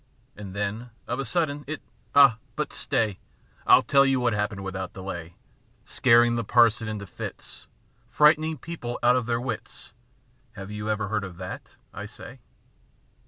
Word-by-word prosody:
And 100 -2 -9
then, 105 +4 -3 0.2
of 125 - -3
a 135 - -2
sudden, 145 +1 -1
it 155 0 -4
â - - -36 0.3
ah, 135 -5 +7 0.2
but 150 -2 -3
stay, 105 -4 -1 0.5
m - - +8
tell 140 -1 +5
you 135 -1 +2
what 120 -2 +1
happened 105 -1 -2
without 95 -1 -5
delay, 85 -3 -7
â - - -36
Scaring 120 0 +4
the 115 - -1
parson 115 0 +3
into 105 -2 -5
fits. 90 - -9 0.4
Frightening 155 +1 +4
the 155 - -10
people 140 -8 -5
out 125 +1 +5
of 125 -2 -1
their 120 -1 0
wits 120 -2 -6
â 125 -1 -37
Have 95 +1 -8
you 105 0 -4
ever 105 -2 -1
heard 105 -2 -1
of 90 -3 -8
that, 90 +1 -8 0.2
I 105 - -6
say 115 +4 -11
115 Hz, 175 wpm, -26 LUFS, 105-125 Hz, 0.5 s, m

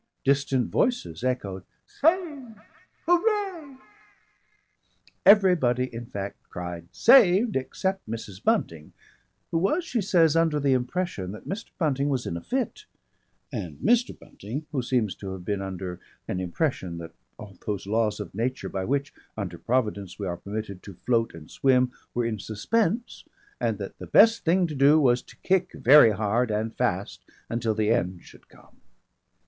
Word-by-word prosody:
Distant 135 -2 +1
voices 245 - 0
echoed 100 -8 -2 0.2
"Saved, 300 - 0 0.5
Hooray!" 350 -5 0 1.5
Everybody 165 - +5
in 115 +1 -7
fact 100 -2 -5
cried 85 -1 -6
"Saved!" 220 -3 +5
except 190 - -2
Mrs. 110 -3 -7
Bunting, 80 -2 0 0.6
who 165 - +1
was, 250 - +1
she 240 -8 -1
says, 170 -5 +3
under 165 -2 +2
the 140 -2 +2
impression 125 - -2
that 105 - -11
Mr. 210 +4 -5
Bunting 145 -4 0
was 130 -3 -1
in 85 - -3
a 85 - -5
fit, 270 - -3 0.7
and - - -5
Mr. 240 0 +2
Bunting, 125 +10 -8
who 140 -4 -1
seems 120 -5 0
to 95 -2 -6
have 90 -2 -9
been 100 0 -1
under 95 -2 -5 0.3
an 90 - -2
impression 90 - -2
that 85 -1 -8 0.2
all 100 -2 -11
those 100 -3 -2
laws 110 +1 0
of 105 -4 -7
nature 125 +6 -2
by 95 - -3
which, 140 +6 -1 0.2
under 90 -5 -5
Providence, 105 -7 -1
we 100 - -4
are 85 -2 -3
permitted 100 -1 -6
to 100 - -11
float 115 0 0
and 80 -2 -12
swim, 130 -2 +3 0.2
were 120 -1 +1
in 110 -2 -2
suspense 220 - -1 0.4
and - - 0
that - - -8
the - - -8
best 230 0 +5
thing 180 +2 +3
to 160 - -4
do 145 +3 +5
was 125 -4 +3
to - - -18
kick 185 -1 +1
very 140 -1 +7
hard 110 +3 0
and 110 +1 -2
fast - - -2 0.3
until 115 -2 0
the 110 0 +1
end 90 -7 -1
should - - -17
come. - - -21
125 Hz, 155 wpm, -26 LUFS, -, 1.5 s, very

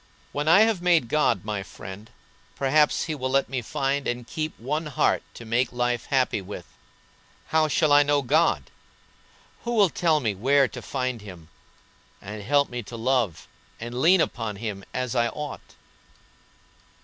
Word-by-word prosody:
When 145 +1 -3
I 175 +6 +7
have 220 -5 +3
made 170 -9 +3
God 120 -10 +1
my 105 -2 -2
friend 95 +2 -10 0.5
perhaps 150 +2 +3
He 160 - -3
will 130 -3 -3
let 135 0 +1
me 130 -1 -2
find 140 +2 -1
and 120 0 -3
keep 155 +5 -4
one 150 +7 -2
heart 145 - +1
to 120 - -10
make 120 +3 +1
life 120 -1 -1
happy 130 -6 +1
with. 95 +2 -8 0.8
How 160 0 +3
shall 155 +1 +2
I 145 - +8
know 145 -1 +2
God? 150 +6 +2 0.9
Who 240 - -2
will 205 -4 +5
tell 160 -3 +2
me 110 -7 -1
where 135 +7 +3
to - - -9
find 130 -4 -3
Him, 90 -6 -12 0.7
and 105 +1 -8
help 140 +6 +2
me 120 0 -5
to 115 +2 -9
love 120 -6 0 0.3
and 120 +2 -5
lean 180 +3 +6
upon 110 -7 -2
Him 100 -2 -5
as 125 -2 -3
I 120 -2 +2
ought?" 150 +4 -7
130 Hz, 165 wpm, -25 LUFS, 115-150 Hz, 0.9 s, I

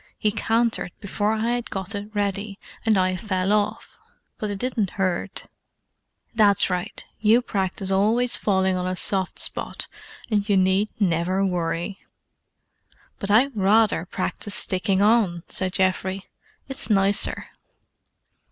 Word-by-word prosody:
"He 210 - +1
cantered 225 -1 0
before 205 +1 -1
I 220 +1 -1
had 240 -1 -2
gotted 200 +2 -6
ready, 200 0 -2 0.3
and 215 -2 +4
I 185 0 +1
fell 185 0 -1
off. 210 -1 -2 0.4
But 215 -3 -3
it 205 - -3
didn't 225 -4 -2
hurt." 185 -3 -2 0.9
"That's 205 -4 +3
right. 180 -1 -4
You 225 +3 +4
practise 190 -3 -2
always 225 +6 +3
falling 190 -2 +1
on 180 0 -2
a 185 - -1
soft 190 0 +1
spot, - - -2 0.4
and 205 0 0
you 200 - +4
need 190 +3 +2
never 185 0 +1
worry." 175 +1 -2 1.2
"But 200 - -4
I'd 245 +6 +3
rather 205 -2 +3
practise 205 +2 -3
sticking 190 +1 +2
on," 205 -6 +2
said 185 -1 -1
Geoffrey. 190 +1 0 0.4
"It's 270 -2 -6
nicer." 195 -1 +2
200 Hz, 130 wpm, -23 LUFS, 185-215 Hz, 1.2 s, and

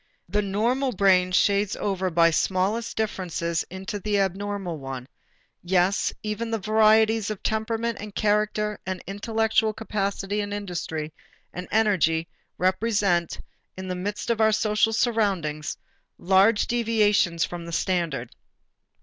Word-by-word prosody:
The 210 - 0
normal 235 +7 0
brain 185 -2 +3
shades 200 +2 +2
over 190 -2 -1
by 165 -1 +4
smallest 195 +7 0
differences 175 -6 -2
into 190 +3 -5
the 205 +1 0
abnormal 195 -3 -2
one; 135 -2 -7 0.5
yes, 185 +2 +1
even 215 +2 -3
the 225 - 0
varieties 220 +1 +3
of 215 -2 -5
temperament 225 +1 -1
and 210 -1 -8
character 210 0 0
and 185 -1 -5
intellectual 220 +2 0
capacity 205 -1 -2
and 205 0 -4
industry 170 -6 -4 0.4
and 180 0 -6
energy 175 -7 +2 0.3
represent, 185 -2 +1 0.4
in 190 0 -6
the 180 - -2
midst 205 +5 -3
of 225 -1 0
our 220 0 +5
social 215 0 +2
surroundings, 200 -10 0 0.4
large 195 +4 +4
deviations 210 -7 +2
from 170 -1 -7
the - - -6
standard. 165 -9 -1
200 Hz, 125 wpm, -25 LUFS, 180-215 Hz, 0.5 s, our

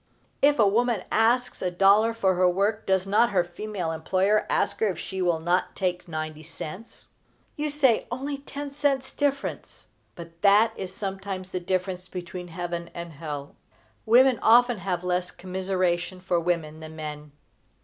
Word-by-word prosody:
If 290 +1 +5
a 220 - +5
woman 230 -1 +1
asks 240 +3 +2
a 185 - 0
dollar 195 +5 +4
for 190 -4 +2
her 180 0 +3
work, 200 +4 0
does 190 -1 +2
not 210 +4 +3
her 185 -3 +2
female 180 -1 -4
employer 190 +6 +1
ask 200 - 0
her 220 - +2
if 185 -5 -2
she 190 +2 -5
will 175 -3 +2
not 175 +3 0
take 180 -2 -2
ninety 155 -1 -5
cents? 170 +6 -9 0.5
You 300 0 -2
say 275 -6 +2
"only 275 +3 -4
ten 285 0 -7
cents 275 -2 0
difference;" 280 -1 -3 0.3
but 170 -1 -11
that 210 +3 +5
is 190 -1 -6
sometimes 190 -1 -5
the 185 - -2
difference 185 0 -2
between 180 -1 -7
heaven 170 0 -5
and 170 -1 -7
hell. 145 -2 -7 0.5
Women 250 +2 +6
often 240 0 +5
have 180 -1 -2
less 180 0 0
commiseration 185 -1 -2
for 180 -1 0
women 165 -2 -2
than 160 0 -9
men. 150 -1 -7
185 Hz, 160 wpm, -26 LUFS, 175-220 Hz, 0.5 s, Women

